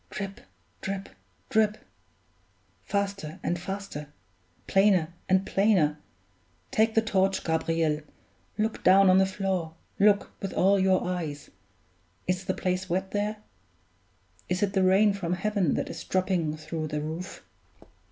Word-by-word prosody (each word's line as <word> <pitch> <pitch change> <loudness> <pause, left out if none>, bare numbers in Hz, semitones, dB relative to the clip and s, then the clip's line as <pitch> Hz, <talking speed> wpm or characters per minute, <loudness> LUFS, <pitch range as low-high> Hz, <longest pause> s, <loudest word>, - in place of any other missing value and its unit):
"Drip, 195 -1 -6 0.4
drip, 195 0 -4 0.4
drip! 215 -1 +3 1.0
Faster 200 -6 -3
and 175 - -1
faster; 185 -6 -6 0.5
plainer 190 -4 +3 0.2
and 190 +1 +3
plainer. 185 -8 +2 0.7
Take 220 +1 +2
the 225 - +4
torch, 195 -3 +1
Gabriel; 160 -1 0 0.6
look 215 +1 -1
down 190 0 +7
on 185 - +6
the 190 - +4
floor 190 -4 -2 0.2
look 205 0 +4
with 195 - -4
all 195 +1 +4
your 190 -1 +3
eyes. 160 -5 -4 0.7
Is 185 +1 -1
the 185 - -1
place 185 0 -2
wet 190 +2 -1
there? 210 +1 -2 1.1
Is 180 +2 0
it 195 -1 0
the 190 - +2
rain 195 +3 +5
from 180 -3 -2
heaven 195 -3 0
that - - -2
is - - -7
dropping 180 -5 0
through 155 0 -4
the 150 0 -3
roof?" 160 +5 -6
190 Hz, 135 wpm, -27 LUFS, 170-200 Hz, 1.1 s, down